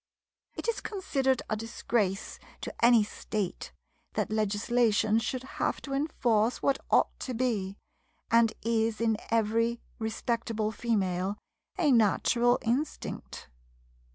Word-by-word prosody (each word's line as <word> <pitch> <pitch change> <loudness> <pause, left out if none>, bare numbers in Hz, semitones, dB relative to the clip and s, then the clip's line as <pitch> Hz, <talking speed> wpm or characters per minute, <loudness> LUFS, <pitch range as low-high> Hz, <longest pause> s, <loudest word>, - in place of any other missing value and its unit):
It - - -5
is 465 - 0
considered 270 - 0
a 215 - 0
disgrace 215 -2 -2 0.2
to - - -5
any 235 -2 +7
state 210 -2 -4 0.4
that - - -1
legislation 215 +1 +2
should 250 +3 -3
have 265 - -2
to 275 - -5
enforce 240 -6 +1
what 275 -1 +1
ought - - +3
to 255 - -4
be, 215 -6 -1 0.5
and 230 -1 +5
is 225 -1 +1
in 225 -1 +2
every 230 +1 +1 0.2
respectable 225 -1 -1
female, 200 -4 -1 0.4
a 320 -6 +3
natural 240 +2 +4
instinct. 255 - -3
230 Hz, 115 wpm, -29 LUFS, 215-245 Hz, 0.5 s, any